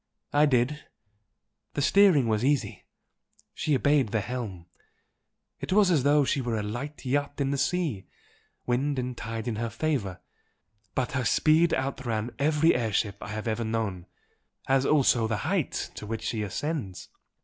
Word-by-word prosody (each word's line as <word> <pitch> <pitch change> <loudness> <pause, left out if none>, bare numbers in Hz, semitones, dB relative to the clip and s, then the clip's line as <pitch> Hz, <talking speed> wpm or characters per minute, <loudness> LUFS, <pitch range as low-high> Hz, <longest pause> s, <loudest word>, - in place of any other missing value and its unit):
"I 150 +1 +5
did. 130 +3 +1 0.9
The - - 0
steering 185 - +5
was 110 0 +1
easy 140 0 0 0.7
she 150 - 0
obeyed 140 0 +3
the 110 0 0
helm, 105 -7 -5 0.9
it - - -5
was 195 -1 +5
as 155 -5 +3
though 145 +1 +4
she 135 - 0
were 120 -3 -2
a 105 - -2
light 125 +8 -6
yacht 145 +3 -1
in 140 0 0
a - - -1
sea, 150 - -1 0.6
wind 135 +3 0
and 125 0 -3
tide 115 +1 -5
in 115 -3 -2
her 115 +1 -2
favour. 115 - -2 0.8
But 130 -2 -1
her 130 -1 -1
speed 155 +8 +3
outran 120 -4 -3
every 150 +3 +3
air 115 -3 -1
ship 100 -1 0
I - - -6
have 110 +2 -5
ever 110 +1 -1
known 110 -5 -3 0.6
as 135 0 +2
also 125 -6 +3
the 110 -1 -1
height - - -1
to 105 - -8
which 110 0 -4
she 110 0 -2
ascends." 105 - -4
125 Hz, 160 wpm, -27 LUFS, 110-145 Hz, 0.9 s, I